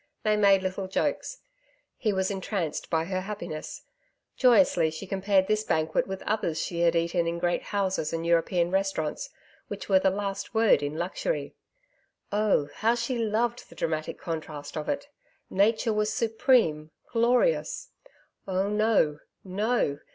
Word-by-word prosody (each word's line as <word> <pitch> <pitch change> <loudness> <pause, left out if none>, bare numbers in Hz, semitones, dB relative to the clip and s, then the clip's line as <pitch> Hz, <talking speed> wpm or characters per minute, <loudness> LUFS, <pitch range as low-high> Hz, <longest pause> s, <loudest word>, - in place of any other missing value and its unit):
They 215 -1 +3
made 200 -2 +4
little 185 +1 -3
jokes. - - -2 0.5
He 220 -4 0
was 190 0 0
entranced 190 -4 -3
by 160 -1 +1
her 185 +1 -2
happiness. 175 -6 -6 0.5
Joyously 195 - +4
she 160 +5 -7
compared 195 0 +2
this 215 +2 +1
banquet 160 -4 0
with 190 0 -5
others 200 -7 -1
she 170 - -3
had 170 0 +3
eaten 170 0 +1
in 170 0 -1
great 175 0 0
houses 190 -6 -1
and 165 0 -3
European 170 +1 +2
restaurants, 190 -5 -1 0.4
which 205 0 -7
were 190 -1 +6
the 190 - +3
last 200 +2 -4
word 220 -6 +5
in 145 +2 -3
luxury. 185 - -2 0.8
Oh! 205 -8 +2
how 230 +2 +2
she 240 +1 -2
loved 230 +2 -1
the - - -14
dramatic 155 -1 -2
contrast 155 -3 -6
of 155 - -4
it. 285 0 -2 0.4
Nature 220 +3 +2
was 210 0 +1
supreme, 220 - +2 0.2
glorious.... 245 - +2 0.6
Oh 190 +1 0
no, 210 -8 +2 0.2
no! 195 -6 0
195 Hz, 145 wpm, -27 LUFS, 170-215 Hz, 0.8 s, were